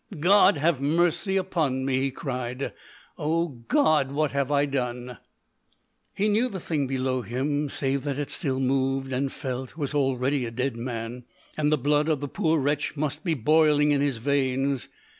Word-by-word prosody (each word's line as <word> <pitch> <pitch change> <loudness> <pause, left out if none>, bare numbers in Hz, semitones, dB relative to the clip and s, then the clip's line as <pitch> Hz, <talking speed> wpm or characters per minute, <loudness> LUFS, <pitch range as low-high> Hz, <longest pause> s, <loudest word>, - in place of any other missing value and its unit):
"God 185 0 +5
have 150 -2 +1
mercy 175 +6 +1
upon 160 -9 0
me!" 130 -1 +1
he 135 +1 0
cried. 130 -1 -4 0.5
"O 165 +3 0
God! 140 - +1
what 150 +1 0
have 140 -1 -1
I 145 0 +3
done?" 125 -3 -3 1.0
He 205 - +1
knew 220 +4 +2
the 190 - -5
thing 150 -5 -1
below 130 -1 -1
him, 140 +6 -2
save 135 0 -1
that 140 -2 -2
it 145 -1 -3
still 135 -6 -2
moved 135 0 0
and 135 +1 -1
felt, 130 +2 -5
was 145 -2 -2
already 135 -1 +1
a - - -4
dead 125 +2 -2
man 120 0 -5 0.3
that 150 -1 +1
the 155 - +3
blood 150 +3 +1
of 155 -3 +1
the 145 - -4
poor 160 +3 +1
wretch 145 +1 -1
must 150 +1 -2
be 165 -3 0
boiling 150 +2 +4
in 140 -1 +2
his 140 -4 0
veins. 135 0 0
140 Hz, 175 wpm, -26 LUFS, 130-150 Hz, 1.0 s, God